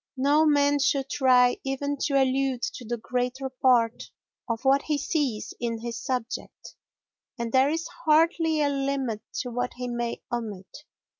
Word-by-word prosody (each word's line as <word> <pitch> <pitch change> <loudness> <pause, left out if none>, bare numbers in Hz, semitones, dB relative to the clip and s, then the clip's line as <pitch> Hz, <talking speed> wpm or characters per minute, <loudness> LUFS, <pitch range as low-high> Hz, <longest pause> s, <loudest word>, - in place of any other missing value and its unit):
No 290 +4 +4
man 285 -1 +3
should 270 0 +1
try 250 -3 +4
even 280 +1 -2
to 275 -1 +2
allude 265 -1 +1
to - - -4
the 240 +1 -3
greater 250 +3 -2
part 245 -3 +2 0.4
of 230 +3 -3
what 275 +1 +4
he 300 -1 -1
sees 280 -6 -2
in 235 -1 -2
his 235 0 -5
subject, 250 -2 -5 0.6
and 235 -1 -3
there 265 +2 +4
is 325 +2 -2 0.2
hardly 320 0 +3
a 285 - +2
limit 275 -5 -2 0.2
to 250 - -6
what 245 +1 -2
he 250 0 -5
may 240 -1 -3
omit. 210 -6 -5
260 Hz, 155 wpm, -26 LUFS, 240-285 Hz, 0.6 s, No